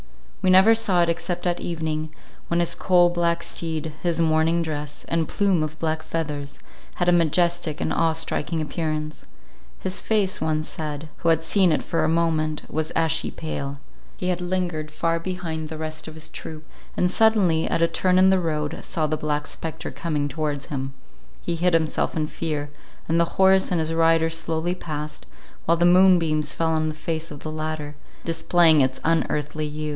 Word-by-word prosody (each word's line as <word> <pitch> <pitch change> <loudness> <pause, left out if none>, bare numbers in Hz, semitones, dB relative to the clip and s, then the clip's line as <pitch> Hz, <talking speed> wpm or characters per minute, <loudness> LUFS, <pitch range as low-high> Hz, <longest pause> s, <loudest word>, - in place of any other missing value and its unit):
We 190 - +2
never 190 +4 +7
saw 195 -6 +3
it 170 - +1
except 175 +1 -2
at 175 -1 0
evening, 155 -2 -3 0.4
when 170 - +1
his 170 - +2
coal 175 -2 +4
black 170 -1 0
steed, 160 -2 -3
his 170 -2 0
mourning 165 +1 +2
dress, 150 -2 -5
and 165 -1 0
plume 195 -5 +1
of 155 0 -3
black 160 0 -1
feathers, 150 -3 -4 0.4
had 175 - -1
a - - +6
majestic 170 -1 +2
and - - -1
awe 165 -1 +2
striking 160 0 -2
appearance; 155 -1 -3 0.5
his 185 0 -3
face, 205 -4 +1
one 155 -1 0
said, 155 -1 -5
who 170 - 0
had 165 0 +3
seen 185 +1 +3
it 155 - +1
for 165 - 0
a - - +2
moment, 160 -2 0
was 155 0 -2
ashy 160 0 +2
pale; 140 -3 -5 0.4
he 180 - -2
had 180 -1 -1
lingered 175 -4 -2
far 165 +2 -1
behind 165 -3 -4
the 160 - -6
rest 155 0 -5
of 160 - -9
his 160 0 -6
troop, 155 -1 -8 0.3
and 180 0 +2
suddenly 195 -7 +3
at 165 - +1
a - - +5
turn 185 +1 +2
in 190 +1 +6
the 190 - +3
road, 155 -3 -2
saw 165 -4 -1
the 155 +1 0
Black 150 -1 -2
Spectre 160 -2 -5
coming 145 +1 -2
towards 145 0 -3
him; 135 -1 -5 0.5
he 170 - -1
hid 170 +1 +2
himself 160 -1 0
in 155 - +1
fear, 150 -2 -4 0.4
and 165 +1 +2
the 170 - +4
horse 190 0 +5
and 180 - +1
his 160 0 -1
rider 165 0 +3
slowly 165 +1 -1
past, 150 -4 -6 0.4
while 170 +1 +3
the 170 - +3
moonbeams 175 -4 +4
fell 165 -1 +1
on 155 0 +1
the 155 - -3
face 160 +1 -3
of 145 -2 -9
the 155 - -5
latter, 155 -1 -4 0.3
displaying 165 -1 +4
its 130 0 0
unearthly 155 -2 0
hue. 150 +1 -6
160 Hz, 185 wpm, -24 LUFS, 155-175 Hz, 0.5 s, never